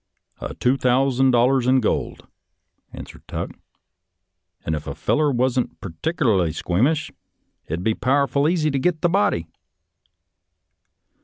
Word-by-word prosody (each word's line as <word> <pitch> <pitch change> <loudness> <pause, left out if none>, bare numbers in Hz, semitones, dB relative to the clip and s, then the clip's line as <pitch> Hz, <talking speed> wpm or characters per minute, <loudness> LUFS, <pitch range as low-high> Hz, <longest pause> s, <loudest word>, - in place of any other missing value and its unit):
" - - -51
" - - -40
A - - -6
thousand 130 +1 +2
dollars 125 +1 +3
in 130 +1 +4
gold," 110 - -2 0.7
answered - - -11
Tuck, - - -4 1.1
"and 80 - -1
if 75 -1 -4
a - - -5
feller 150 -1 +1
wasn't 125 0 -1
partick 100 - -5
erly 95 - +1
squeamish, 130 - 0 0.6
it'd 85 +3 -4
be 110 - +2
powerful 140 +3 +1
easy 160 -3 +1
to 135 - -1
git 160 +3 0
the 175 - +2
body." 170 - +1
130 Hz, 135 wpm, -22 LUFS, 110-145 Hz, 1.1 s, in